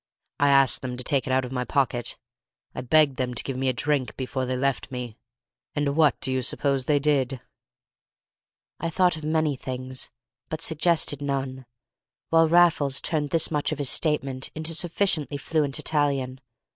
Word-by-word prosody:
I 145 - +4
asked 135 -1 +4
them 125 -1 -5
to 125 - -4
take 135 +1 0
it - - -1
out 130 0 +2
of 125 - -8
my 125 -1 -1
pocket. 125 -3 0 0.6
I - - -4
begged 140 +1 +3
them 125 -1 -2
to - - -2
give 135 - -4
me 130 +1 0
a - - +1
drink 140 +1 -1
before 130 0 -3
they 130 0 -1
left 140 0 -1
me. 125 -3 -5 0.6
And 145 -1 0
what 155 -3 +3
do 130 - -1
you 130 - 0
suppose 135 +1 0
they 150 0 +3
did?" 135 -3 +1 1.4
I 165 - -2
thought 180 +1 +3
of 155 - -8
many 155 -1 +1
things 130 0 -6 0.4
but 155 - -3
suggested 160 -3 +1
none, 135 -2 -3 0.6
while 165 0 +4
Raffles 160 -5 +4
turned 150 -3 -1
this 165 +2 +1
much 150 -1 0
of 155 - -2
his 140 -3 +1
statement 140 -4 0
into 160 +1 -2
sufficiently 160 -4 0
fluent 145 -1 0
Italian. 140 -4 -1
140 Hz, 175 wpm, -25 LUFS, 130-155 Hz, 1.4 s, I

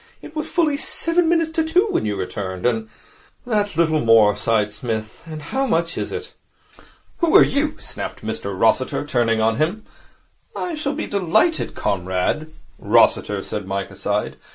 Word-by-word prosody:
It 310 - -12
was 310 +1 -3
fully 310 -5 +1
seven 330 +2 +1
minutes 330 -1 +2
to 320 0 +1
two 355 +6 +2
when - - 0
you 105 - -1
returned, 95 0 -4
and 110 -2 0 0.3
' - - -30
'That 205 -7 -1
little 160 -2 +3
more,' 115 -4 +5
sighed 105 -2 0
Psmith, 110 0 -5
'and 155 -2 -7
how 265 - -1
much 165 -5 0
is - - -3
it!' 440 0 -6 0.9
'Who 335 -2 +2
are - - +10
you?' 295 +2 -1
snapped - - -7
Mr - - -4
Rossiter, - - +2
turning 120 -5 +1
on 110 0 +2
him. 175 +8 -1 0.7
'I 355 - -3
shall 300 -2 -2
be 310 - -3
delighted, 200 - +1
Comrade 95 - -1 0.2
' - - -31
'Rossiter,' - - +3
said 105 -3 -5
Mike, 100 0 -3
aside. - - -2
160 Hz, 170 wpm, -21 LUFS, -, 0.9 s, are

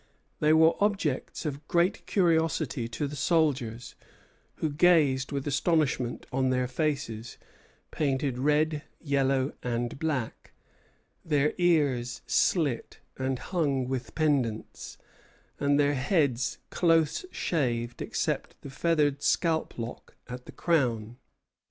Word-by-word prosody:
They 150 - +3
were 160 +1 +6
objects 190 -9 -1
of 145 0 -5
great 175 +2 +1
curiosity 160 - +1
to 120 +5 -3
the 145 +1 -5
soldiers, 135 -7 0 0.6
who 155 - -2
gazed 145 -5 +3
with 140 -1 -3
astonishment 145 -4 0
on 130 0 +1
their 125 0 +1
faces, 125 -5 -3 0.5
painted 135 -3 -1
red, 150 +2 +2 0.2
yellow, 135 -2 +1
and 120 +1 -3
black, 140 -8 -3 0.7
their 150 -1 +1
ears 140 -9 +1
slit 145 -10 +1 0.2
and 130 0 -1
hung 140 -4 -1
with 130 -2 -4
pendants, 135 -8 -1 0.6
and 145 0 +2
their 145 0 +3
heads 135 - +1
close 165 - +2
shaved, 120 -7 -1
except - - -2
the 140 - -8
feathered 145 -2 +1
scalp 160 +1 +1
lock 115 +1 -7
at 125 0 -8
the - - -8
crown. 120 -8 0
140 Hz, 115 wpm, -28 LUFS, 125-160 Hz, 0.7 s, were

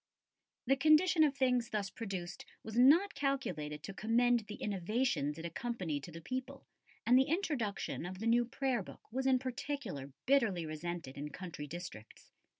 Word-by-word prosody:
The 270 +2 +4
condition 310 +4 +5
of 285 -2 +2
things 250 -3 +2
thus 205 -2 -2
produced 190 -6 -5 0.2
was 220 0 -7
not 305 +11 +6
calculated 155 - -2
to 195 - -6
commend 240 +4 +3
the 210 - -6
innovations 195 - -1
it 165 - -6
accompanied 170 -5 -3
to 175 - -10
the 165 +1 -9
people, 260 +7 -5 0.4
and 245 - +5
the 265 - +3
introduction 280 - -1
of 185 +1 -6
the 220 - -5
new 240 +1 +4
Prayer 255 -1 -1
book - - -11
was 265 +1 0
in 260 -1 +5
particular 250 - -4
bitterly 225 -11 +3
resented 155 -2 -5
in 150 +1 -4
country 165 -4 -7
districts. 150 -9 -9
225 Hz, 160 wpm, -34 LUFS, 175-265 Hz, 0.4 s, not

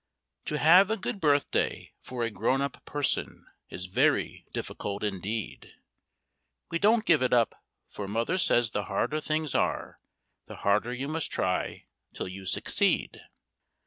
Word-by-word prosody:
To 150 - -1
have 180 +6 +7
a 220 - 0
good 200 +1 -4
birthday 145 -2 +1
for 125 -2 -4
a 115 - -1
grown 115 +6 +1
up 140 -1 -3
person 145 -2 -2 0.2
is 90 - -6
very 130 +11 +1
difficult 100 0 -4
indeed; 105 +2 -4 1.0
We 165 - 0
don't 220 +3 +4
give 155 -5 +4
it 130 - +2
up, 120 -2 +2 0.3
for 100 - -6
Mother 115 - 0
says 120 -9 +3
the 105 -1 -2
harder 150 +10 -1
things 155 -1 -1
are, - - -1 0.5
the - - -9
harder 105 +4 +2
you 130 +3 -3
must 160 +1 -3
try 90 0 -1 0.3
till - - -4
you 95 +1 -8
succeed. - - +1
130 Hz, 145 wpm, -28 LUFS, 105-155 Hz, 1.0 s, have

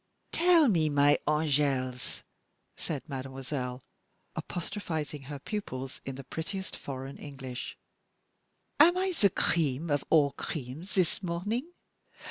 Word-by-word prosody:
"Tell 340 -3 +6
me, 165 -8 +3
my 145 0 +5
angels," 140 -4 +1 0.5
said 155 -1 -4
mademoiselle, 130 -2 -4 0.5
apostrophizing 160 -5 -3
her 145 - -4
pupils 135 -6 -5
in 135 - -4
the 135 - -7
prettiest 175 +8 -5
foreign 135 0 -6
English, 135 -3 -6 1.0
"am 345 +4 +8
I 380 +1 +2
the 215 - +4
cream 160 -3 +1
of 145 - +2
all 145 -3 +6
creams 145 +5 -5
this 185 -2 +2
morning? 205 - -2
150 Hz, 110 wpm, -30 LUFS, 135-185 Hz, 1.0 s, am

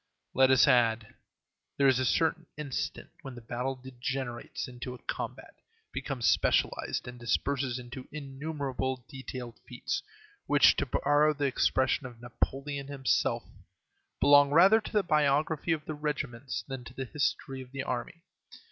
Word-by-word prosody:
Let 130 0 +5
us 130 -1 +6
add, 115 -2 +4
that - - -20 0.6
there 140 - +4
is 130 -1 +4
a 130 - +1
certain 165 +3 +1
instant 145 -3 -4
when 135 -2 -8
the - - -8
battle 125 +3 -3
degenerates 130 -1 -5
into 125 0 -7
a - - -16
combat, - - -5 0.4
becomes 130 -5 -3
specialized, - - +1
and 125 0 -8
disperses 130 +1 0
into 125 +1 -8
innumerable 135 -3 -4
detailed 130 -3 -8
feats, - - -3 0.5
which, 145 -1 +6
to 140 - 0
borrow 145 +4 +3
the 145 0 -1
expression 130 -1 +1
of 120 -2 -13
Napoleon 135 +3 -3
himself, 140 -2 0 0.8
"belong 145 0 +7
rather 190 +9 +6
to - - -8
the 210 -2 +2
biography 155 0 +2
of 155 -2 -1
the 155 - -4
regiments 145 -4 -3
than 135 -2 -6
to 125 - -11
the 130 - -4
history 135 -1 -2
of 125 -1 -12
the 135 0 -4
army." 130 +7 -4
135 Hz, 150 wpm, -30 LUFS, 125-145 Hz, 0.8 s, belong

